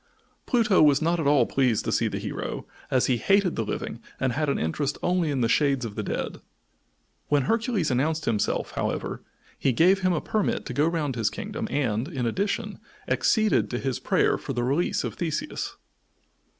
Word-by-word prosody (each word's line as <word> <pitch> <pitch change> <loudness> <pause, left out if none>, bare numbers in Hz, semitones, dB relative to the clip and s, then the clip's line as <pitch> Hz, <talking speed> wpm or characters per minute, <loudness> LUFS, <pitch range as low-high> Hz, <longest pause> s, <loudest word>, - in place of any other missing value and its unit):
Pluto 225 -7 +3
was 145 -2 +6
not 170 +2 +1
at 150 - 0
all 140 -4 +5
pleased 125 -5 +1
to - - -1
see - - +2
the - - -3
hero, - - -4 0.2
as 130 -2 +2
he 125 - +2
hated 195 - +2
the 115 - -1
living 110 +2 -4 0.2
and 130 -2 0
had 150 +2 0
interest 140 - -1
only 180 -3 +1
in 135 -3 0
the 115 - +3
shades 135 0 +2
of 110 - -5
the 105 - -3
dead. - - -4 0.9
When 145 -2 +2
Hercules 225 - 0
announced 155 +5 0
himself, 105 -3 0
however, - - -3 0.4
he 135 - +2
gave 185 +9 +4
him 185 -1 +2
a 170 - +1
permit 215 +4 -1
to - - -5
go 145 +5 +2
round 155 -6 -1
his 115 -3 +1
kingdom - - -5
and, 120 -3 0
in 135 -8 -3
addition, 195 - -2 0.3
acceded 215 - +2
to 120 - -2
his 130 -1 -2
prayer - - +2
for - - -5
the 120 - -1
release 140 +8 0
of - - -3
Theseus. 175 - -3
145 Hz, 190 wpm, -26 LUFS, 125-175 Hz, 0.9 s, was